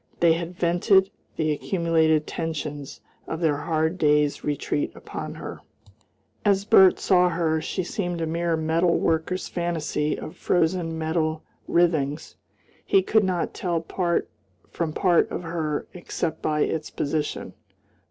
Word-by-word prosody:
They 170 -1 +5
had 170 +2 -4
vented 185 +3 +3 0.2
the 155 -1 0
accumulated 160 -1 +1
tensions 150 -3 -5 0.3
of 160 - -4
their 155 -4 +2
hard 160 +3 -1
day's 150 -1 +2
retreat 145 0 -1
upon - - -7
her. - - -8 0.8
As 200 -1 +2
Bert 190 -3 +7
saw 180 -2 +3
her, 165 -2 0
she 185 +3 -3
seemed 175 -2 -3
a 165 - -1
mere 165 +1 0
metal 165 +2 +2
worker's 165 +3 0
fantasy 165 -3 -1
of - - -8
frozen 165 -1 0
metal 160 0 -1 0.2
writhings. 160 -4 +1 0.5
He 390 -1 +3
could 220 -1 +3
not 185 -3 -1
tell 175 -3 -1
part 170 +1 -1 0.4
from 165 -2 -2
part 175 +1 +3
of - - -4
her, 160 -3 -2
except 170 -2 -4
by 150 -1 0
its 155 0 -1
position. 150 +1 -3
165 Hz, 135 wpm, -25 LUFS, 155-175 Hz, 0.8 s, Bert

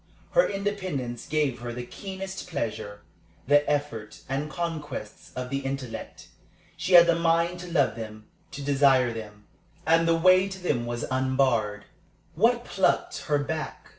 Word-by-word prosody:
Her - - +4
independence 185 - -3
gave 150 -5 0
her 120 0 -5
the 120 +1 -5
keenest 190 +3 -7
pleasure. 105 -8 -4 0.4
The 145 +2 +4
effort 140 -8 -2
and 140 +3 -2
conquests 150 -9 -5
of 125 0 -4
the 140 - 0
intellect 135 -4 -6 0.5
she 185 - -2
had 170 -1 +10
the 170 - +4
mind 170 +1 +1
to 175 0 -8
love 140 -8 +2
them, 110 -1 -8 0.3
to 145 - -6
desire 135 -3 +4
them; 105 -2 -9 0.4
and 165 +1 +4
the 165 0 +4
way 185 +3 +5
to 190 - -7
them 140 -10 -1
was 120 -1 -3
unbarred. 130 -6 +1 0.5
What - - +2
plucked - - 0
her 150 - +2
back? 155 +2 -4
140 Hz, 150 wpm, -27 LUFS, 120-170 Hz, 0.5 s, had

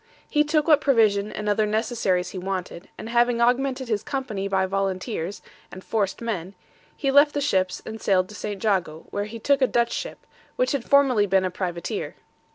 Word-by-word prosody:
He 300 - +2
took 300 0 +1
what 300 -3 +5
provision 215 -7 +3
and 210 - -5
other 210 +1 +2
necessaries 215 -4 0
he 185 - -6
wanted, 185 -1 -5
and - - -7
having 240 0 +2
augmented 255 +2 +1
his 215 -3 0
company 220 -8 -3
by 190 -1 +1
volunteers 195 0 -3 0.3
and 185 - -10
forced 205 -1 -2
men, 195 -5 -4 0.4
he 275 -2 0
left 290 +2 +5
the - - +1
ships 190 -10 0
and 220 0 -7
sailed 185 -2 +2
to - - -10
St. 205 -1 -5
Jago, 180 -7 0
where 205 0 -2
he 220 +2 -8
took 275 +5 +1
a 260 - +5
Dutch 235 -1 +1
ship, - - -5 0.3
which - - +1
had 280 -5 -3
formerly 265 -7 +4
been 190 0 +2
a 185 - -2
privateer. 175 -2 -4
215 Hz, 190 wpm, -24 LUFS, 190-260 Hz, 0.4 s, what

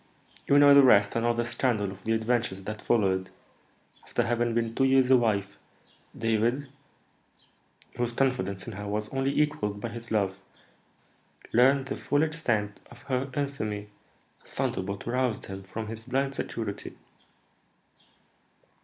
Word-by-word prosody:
You 140 - +5
know 145 0 +8
the 140 - +9
rest, 105 -6 +5
and 115 - 0
all 120 - +2
the 120 0 0
scandal 115 -4 0
of 95 0 -12
the 115 - +1
adventures 110 -3 0
that 105 +2 -6
followed. 95 -5 +1 0.7
After - - -1
having 120 0 0
been 115 -1 0
two 135 - +2
years 130 -1 +4
a - - +9
wife, 100 -5 0 0.6
David, 115 +5 0 1.3
whose 120 -1 0
confidence 115 -7 -1
in 115 - -7
her 105 +1 -6
was 105 +2 -3
only 135 0 0
equalled 105 -9 0
by 115 - -4
his 115 +1 -8
love, 100 -3 0 1.1
learned 130 +3 +4
the 135 - -4
full 145 +1 +1
extent 120 -11 -1
of 120 +3 -15
her 135 0 -2
infamy, 110 -8 -3 0.5
a - - -22
thunderbolt 100 +1 -3
aroused 125 -1 -1
him 95 0 -7
from 110 +4 -6
his 110 +1 -7
blind 135 +2 0
security." 110 -6 -5
115 Hz, 145 wpm, -28 LUFS, 105-130 Hz, 1.3 s, the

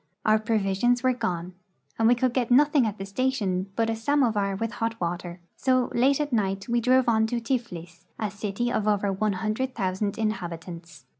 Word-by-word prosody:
Our 215 0 +4
provisions 220 +2 +1
were 255 0 +3
gone, 180 -6 -3 0.5
and 225 - +4
we 245 - +5
could 250 0 0
get 245 -2 0
nothing 285 0 +4
at 210 -1 -4
the 195 - -5
station 200 -4 -1
but 225 -1 +1
a 225 - -1
samovar 225 -6 +1
with 225 +3 -3
hot 225 0 -3
water; 175 0 -4 0.2
so, 255 -2 +1
late 265 +4 +3
at 295 -3 -2
night, 195 -3 0
we 235 0 +1
drove 255 +1 +3
on 220 -1 +3
to 240 +1 -1
Tiflis, 180 -9 -4
a 215 -2 -2
city 210 +3 -3
of 215 -3 -1
over 205 -1 +1
one 210 +2 0
hundred 220 +7 -2
thousand 195 0 -2
inhabitants. 175 -5 -5
220 Hz, 190 wpm, -26 LUFS, 195-245 Hz, 0.5 s, we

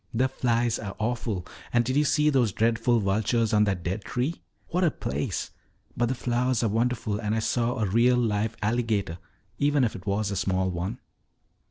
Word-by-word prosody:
The 130 +3 +3
flies 120 -3 0
are 100 -2 -6
awful. 110 -5 -2 0.3
And 120 -1 +3
did 130 +2 -1
you 150 +1 +3
see 150 +1 +3
those 125 -6 +2
dreadful 115 +3 +2
vultures 110 +3 +1
on 105 0 +5
that 95 -4 -1
dead 95 +4 -3
tree? 130 +7 -2 0.3
What 180 +2 +1
a 170 - +5
place! 70 - -3 0.4
But 120 - +1
the 130 - -1
flowers 120 0 0
are 115 - +2
wonderful 115 -1 0
and 105 -1 -1
I - - +1
saw 120 +2 0
a 110 - +1
real 120 +5 +3
live 110 -1 0
alligator, 110 -6 0 0.4
even 145 -1 +3
if 115 - 0
it 95 +1 -10
was 100 +1 0
a - - -2
small 95 0 0
one." 90 +7 -3
115 Hz, 190 wpm, -26 LUFS, 105-125 Hz, 0.4 s, on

